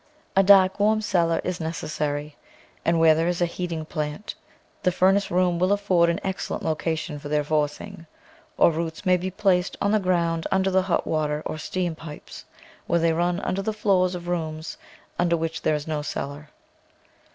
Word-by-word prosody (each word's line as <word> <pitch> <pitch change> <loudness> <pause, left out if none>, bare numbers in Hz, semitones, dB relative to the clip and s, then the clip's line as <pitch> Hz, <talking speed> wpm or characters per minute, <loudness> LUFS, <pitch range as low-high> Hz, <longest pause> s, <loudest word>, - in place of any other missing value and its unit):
A 195 - +6
dark, 190 0 +6
warm 215 +1 +3
cellar 170 -5 +1
is 180 -1 -3
necessary, 150 -2 -3 0.5
and 170 0 +2
where 165 -1 +6
there 165 +2 0
is 175 -1 -1
a 175 - +3
heating 170 -2 -4
plant, 155 +5 -4 0.5
the 180 - +2
furnace 190 +3 +3
room 180 -1 +1
will 185 +2 +2
afford 190 -4 +3
an 170 - 0
excellent 190 -1 -3
location 160 -1 -2
for 145 - -8
their 150 0 +1
forcing, 155 +5 -2 0.5
or - - +5
roots 165 +3 -4
may 185 -1 +5
be 180 +1 -2
placed 185 -1 +1
on 200 - +1
the 215 - +3
ground 170 -3 0
under 190 0 +2
the 190 0 +4
hot 185 -1 0
water 150 -1 -1
or 155 - -4
steam 175 +2 -2
pipes, 155 -2 -10 0.4
where 170 - +2
they 165 0 +2
run 175 +3 0
under 195 0 -1
the 215 +2 -2
floors 190 -4 +2
of 175 -1 -7
rooms 160 -2 -3 0.4
under 170 -1 +2
which 165 0 -3
there 155 - +1
is 150 0 -4
no 155 -2 -2
cellar. 145 0 -5
170 Hz, 185 wpm, -24 LUFS, 155-185 Hz, 0.5 s, A